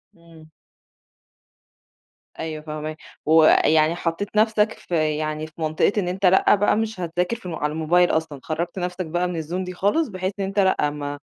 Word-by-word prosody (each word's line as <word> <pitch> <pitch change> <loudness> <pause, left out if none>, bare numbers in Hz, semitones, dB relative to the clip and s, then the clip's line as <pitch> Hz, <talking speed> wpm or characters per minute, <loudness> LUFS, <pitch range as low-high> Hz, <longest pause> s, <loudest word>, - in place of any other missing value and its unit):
امم. 165 -2 -17 1.9
أيوه 155 -1 -4
فاهماك، 155 0 -6 0.3
ويعني 155 0 +5
حطيت 175 +5 -3
نفسك 215 0 +3
في 155 -3 -1
يعني، 155 0 -3
في 155 - -20
منطقة 155 +4 +2
إن 195 -4 0
أنتَ 185 +2 -2
لأ، 190 +3 +5
بقى 205 +1 +2
مش 220 -2 -2
هتذاكر 175 +4 -1
ف 225 -5 -10
على 150 -3 -2
الموبايل 170 +3 +3
أصلًا، 160 -3 -2
خرّجت 170 +3 -3
نفسك 180 0 -3
بقى 175 +3 -1
من 170 -3 -3
الzone 175 +4 -3
دي 180 - -6
خالص. 205 - +1
بحيث 185 -1 -4
إن 195 - 0
أنتَ 195 +1 -2
لأ، 190 -6 +2
ما 145 -1 -5
170 Hz, 170 wpm, -23 LUFS, 155-190 Hz, 1.9 s, ويعني